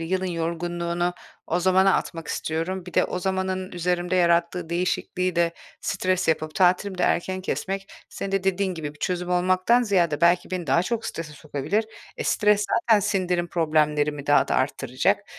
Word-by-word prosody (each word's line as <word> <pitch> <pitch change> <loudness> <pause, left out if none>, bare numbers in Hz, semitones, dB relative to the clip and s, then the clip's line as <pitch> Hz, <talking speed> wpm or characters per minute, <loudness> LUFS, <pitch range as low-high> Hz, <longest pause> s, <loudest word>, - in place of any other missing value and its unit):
yılın 185 +3 -1
yorgunluğunu 170 +1 -2 0.3
o 175 +2 0
zamana 190 +1 +4
atmak 165 -2 -3
istiyorum. 175 +4 -3
Bir 180 - -10
de - - +4
o 180 - -3
zamanın 190 0 -2
üzerimde 180 +1 -1
yarattığı 170 -1 +2
değişikliği 180 0 -1
de 170 -1 +2 0.3
stres 185 -3 -1
yapıp 155 -1 0
tatilimi 185 +1 +2
de - - 0
erken 185 +2 0
kesmek, 195 +1 -3 0.2
senin 195 0 -6
de 195 -1 0
dediğin 190 -1 0
gibi, 150 -2 -6
bir - - -20
çözüm 180 -1 -2
olmaktan 185 +7 +3
ziyade 175 -9 +1
belki 170 +2 +3
beni 180 -3 -3
daha 165 +6 +3
çok 225 +2 -2
strese 165 -2 -6
sokabilir. 155 +8 -2 0.3
Eee, - - -3
stres 210 -1 +3 0.2
zaten 220 -3 +4
sindirim 180 -3 0
problemlerimi 150 -3 +1
daha 145 - +4
da - - 0
arttıracak - - 0
180 Hz, 165 wpm, -24 LUFS, 170-190 Hz, 0.3 s, zamana